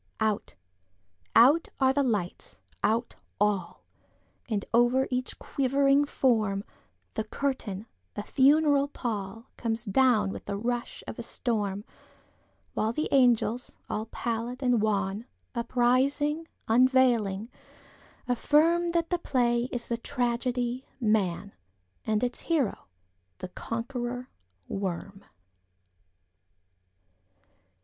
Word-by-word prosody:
Out—out 95 - +1
are 265 -1 +4
the 285 - +2
lights—out 210 - -2 0.3
all! 205 -2 0 0.7
And, 205 -3 -1
over 240 +3 +4
each 250 0 -2
quivering 275 +1 +2
form, 215 -8 +1 0.5
The 220 - -1
curtain, 220 -5 -3 0.3
a 205 - -3
funeral 285 +3 +4
pall, 225 -5 -4
Comes 230 0 -1
down 215 -2 +3
with - - -8
the 200 -1 -3
rush 240 +2 -3
of - - -7
a - - -2
storm, 205 -4 -2 0.9
While 220 +1 0
the 310 - -1
angels, 245 -2 +3
all 215 +1 -2
pallid 235 +3 -3
and 245 -3 +3
wan, 205 +1 0 0.3
Uprising, 260 +6 +1 0.2
unveiling, 235 -3 +3 0.8
affirmThat 330 +6 +2
the 355 - 0
play 240 -5 +1
is 240 -1 -3
the 235 - -1
tragedy, 245 +1 -1
'Man,'And 190 - -2
its 245 0 -1
hero 295 - -1 0.5
the 180 - -7
Conqueror 240 +4 -4 0.4
Worm. 195 +1 -4
235 Hz, 95 wpm, -28 LUFS, 205-260 Hz, 0.9 s, are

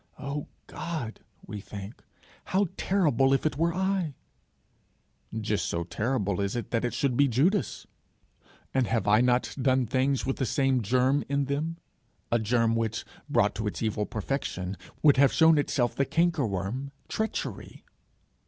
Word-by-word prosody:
'O 140 +1 -4 0.2
God,' 155 -10 -5 0.3
we 105 0 -6
think, 100 +2 -9 0.4
'how 195 +2 +2
terrible 145 - +2
if 135 - -2
it 155 -2 +1
were 165 +4 +2
I!' 190 -4 -1 1.2
Just 105 -5 -1
so 85 - -1
terrible 100 0 -1
is 100 +2 -1
it 120 - -4
that 115 0 0
it 120 -1 -1
should 130 0 +1
be 140 +3 +4
Judas! 155 - +1 0.9
And 130 -3 +2
have 115 -2 0
I 105 +3 +5
not 125 0 +2
done 130 -1 +3
things 130 +3 +1
with 135 - -1
the 130 - 0
same 135 -1 +2
germ 130 +6 +2
in 140 0 +1
them, 150 +4 -2 0.5
a 120 - +3
germ 115 +1 +2
which, 115 -1 -1 0.2
brought - - +3
to 110 +2 -3
its 105 - -3
evil 105 -1 -1
perfection, 100 -5 -3 0.3
would 145 -3 +6
have 140 0 +6
shown 160 -2 +5
itself 125 -4 +1
the 140 - +2
canker 165 -5 +1
worm, 100 +8 -3 0.2
treachery? 220 0 -4
130 Hz, 155 wpm, -28 LUFS, 110-145 Hz, 1.2 s, would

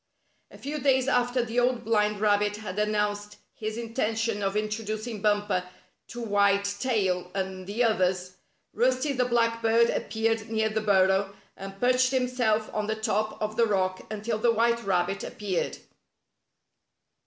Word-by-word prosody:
A - - -14
few 295 +2 -5
days 265 -1 +2
after 245 -1 +1
the 235 +2 -1
Old 245 -1 +1
Blind 210 -2 +1
Rabbit 205 0 +2
had 210 -2 -5
announced 210 -1 -1 0.2
his 215 0 -5
intention 225 -2 -1
of 195 +1 -1
introducing 215 +1 -3
Bumper 205 -3 +1 0.4
to 240 - -7
White 200 -1 +2
Tail 190 -8 0
and 190 -1 -4
the 215 +5 0
others. 185 -5 +1 0.4
Rusty 255 +5 +1
the 250 -1 +1
Black 230 -1 +1
Bird 230 +1 +4
appeared 225 +1 -1
near 220 -1 +1
the 220 0 -1
burrow, 195 -1 +2 0.2
and 195 0 -9
perched 255 +1 +3
himself 250 -4 +1
on 210 -1 -2
the 220 - -1
top 215 0 -1
of 215 0 -3
the 230 -1 +4
rock 185 -2 -1
until 215 +1 -3
the 235 +1 +3
white 235 +1 +1
rabbit 195 0 0
appeared. 200 -4 -3
215 Hz, 150 wpm, -27 LUFS, 205-235 Hz, 0.4 s, Bird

